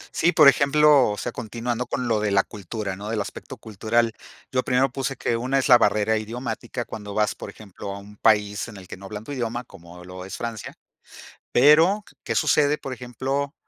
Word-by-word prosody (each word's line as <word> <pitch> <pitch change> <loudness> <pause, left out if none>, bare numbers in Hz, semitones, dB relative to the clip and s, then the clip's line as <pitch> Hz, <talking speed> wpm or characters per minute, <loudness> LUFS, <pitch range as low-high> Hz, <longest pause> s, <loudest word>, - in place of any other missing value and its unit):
Sí, 170 +2 +3
por 150 -5 +6
ejemplo, 140 -2 +5
o 105 - -3
sea, 120 - -4
continuando 120 +2 -4
con 125 - -2
lo 110 -2 +1
de 105 -1 0
la 100 0 +3
cultura, 100 0 -6
¿no? 105 +3 -7
Del 110 - -1
aspecto 100 - -7
cultural, 110 +2 0 0.4
yo 130 -1 +1
primero 130 +1 +1
puse 135 +1 -3
que 115 - -1
una 130 +3 0
es 135 - 0
la 120 - +8
barrera 105 +1 +2
idiomática 120 +2 -5
cuando 105 -3 -8
vas, 105 -1 +1
por - - -9
ejemplo, 100 -2 -10
a - - -7
un 105 +1 -13
país 105 0 +2
en 110 - -10
el 95 -2 -12
que - - -8
no 95 +1 -12
hablan 105 +1 -7
tu 145 - -9
idioma, 120 -2 -3
como 90 -4 -14
lo 90 0 -9
es 95 - -7
Francia, 115 -3 -6 0.8
pero, 160 +10 +5 0.2
¿qué - - -2
sucede, 150 -1 +2
por 135 - -6
ejemplo, 135 +4 -3
115 Hz, 205 wpm, -24 LUFS, 105-130 Hz, 0.8 s, la